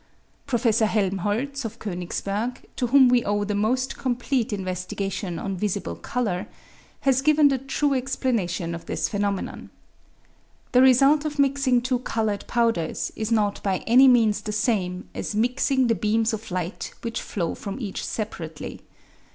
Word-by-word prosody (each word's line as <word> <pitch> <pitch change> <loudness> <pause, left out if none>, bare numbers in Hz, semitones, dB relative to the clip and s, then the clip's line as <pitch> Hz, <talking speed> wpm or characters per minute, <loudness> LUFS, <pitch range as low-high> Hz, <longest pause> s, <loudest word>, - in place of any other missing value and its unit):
Prof. 240 -3 -1 0.2
Helmholtz 215 +6 0
of 225 - -6
Konigsberg, 200 +5 -4
to 250 - 0
whom 265 +1 +6
we 245 -1 +4
owe 205 0 0
the 205 0 -2
most 245 +6 0
complete 245 -1 -1
investigation 185 -1 -3
on 195 -1 -3
visible 180 - -2
colour, 210 - -2 0.5
has 265 -1 +3
given 305 0 +5
the 270 -1 0
true 275 +2 0
explanation 230 -10 -1
of 170 - -8
this - - -1
phenomenon. 200 -1 -3 1.0
The 250 - +5
result 275 +3 +5
of 305 -1 -4
mixing 275 -3 +2
two 255 0 0
coloured 220 -4 -2
powders 230 -9 0
is 220 +1 -3
not 210 -3 +1
by 190 -2 -1
any 255 +4 +7
means 225 -4 +4
the 210 - -4
same 205 -5 -1
as - - -4
mixing 255 +4 +2
the 235 - +3
beams 220 +1 +1
of 220 0 -5
light 180 +1 -4
which 230 -1 -3
flow 170 -5 -3
from 200 +5 -6
each 205 -6 -4
separately. 165 -8 -5
225 Hz, 150 wpm, -24 LUFS, 200-255 Hz, 1.0 s, any